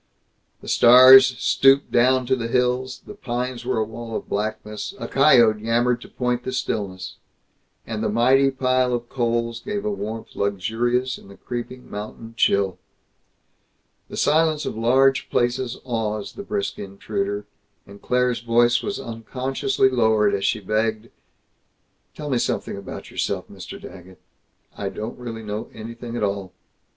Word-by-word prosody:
The - - -12
stars 130 +1 +8
stooped 135 +2 +3
down 130 +1 +3
to 130 +2 +2
the 115 -2 -3
hills; 125 +1 0
the - - -9
pines 125 -7 -4
were 120 - -1
a 110 - +2
wall 115 +1 -7
of - - -5
blackness; 105 - -4
a - - -5
coyote 120 -6 +5
yammered 120 +2 +1
to - - -11
point 125 -1 -2
the - - -4
stillness; 95 -6 -3 0.7
and 110 -1 -4
the - - 0
mighty 130 +5 +4
pile 130 -1 +1
of 120 0 -6
coals 115 -2 -1
gave 205 - -4
a 210 - 0
warmth 110 - -6
luxurious 115 +6 -1
in - - -17
the 100 - -14
creeping 125 +1 -7
mountain 110 +2 -8
chill. 100 -4 +2 1.3
The - - -8
silence 155 0 +2
of - - -4
large 130 +4 +3
places 120 0 0
awes 110 -4 -3
the - - -8
brisk 200 0 -3
intruder, 100 +1 -4 0.4
and 100 0 -14
Claire's 125 -1 +1
voice 120 +1 +3
was 205 - -4
unconsciously 130 +4 -1
lowered 110 -5 +2
as 100 -1 -1
she 110 - 0
begged, 110 +2 -1 1.1
"Tell 150 -2 -5
me 125 - +2
something - - -2
about 100 -1 -8
yourself, - - -2
Mr. - - -9
Daggett. 95 0 -12 0.6
I 100 - -3
don't 110 +5 -6
really 115 -2 -7
know 105 +1 -5
anything 115 +2 -7
at - - -2
all." 100 -2 -2
120 Hz, 150 wpm, -23 LUFS, 110-130 Hz, 1.3 s, stars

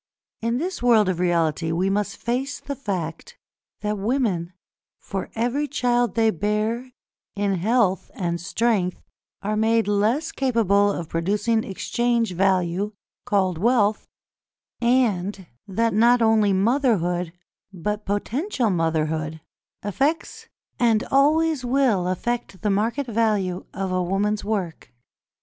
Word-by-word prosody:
In 230 +1 0
this 355 +3 -3
world 225 -5 +4
of 180 -2 -1
reality, 165 -2 +1
we 175 +3 0
must 205 +1 -1
face 255 +4 -2
the 280 - -5
fact 195 - -5 0.4
that 210 -1 -2
women, 200 -7 0 0.5
for 195 -2 -5
every 245 +6 0
child 245 -3 +1
they 225 -1 +3
bear 215 +6 -1 0.5
in 200 -1 0
health 210 -1 +1
and 170 -3 -2
strength, 195 -1 0 0.4
are 210 +2 -1
made 225 0 +2
less 215 +10 +1
capable 205 -6 +2
of 170 -4 -4
producing 210 +7 0
exchange 235 +2 -1
value 190 +2 +1 0.3
(called 185 -4 +1
wealth), 215 -1 +2 0.7
and 210 -6 +1 0.2
that 225 +3 0
not 235 +4 +5
only 220 -3 +3
motherhood, 190 - +1 0.4
but 210 +3 -3
potential 235 - -1
motherhood, 160 -2 -1 0.4
affects 280 - -1 0.3
and 230 -3 +3
always 305 +1 +3
will 245 -8 +2
affect 195 0 -3
the 210 - +2
market 225 +8 0
value 210 -6 0
of 190 -1 -3
a 185 0 +1
woman's 205 +4 0
work. 185 - -3
210 Hz, 120 wpm, -23 LUFS, 185-240 Hz, 0.7 s, not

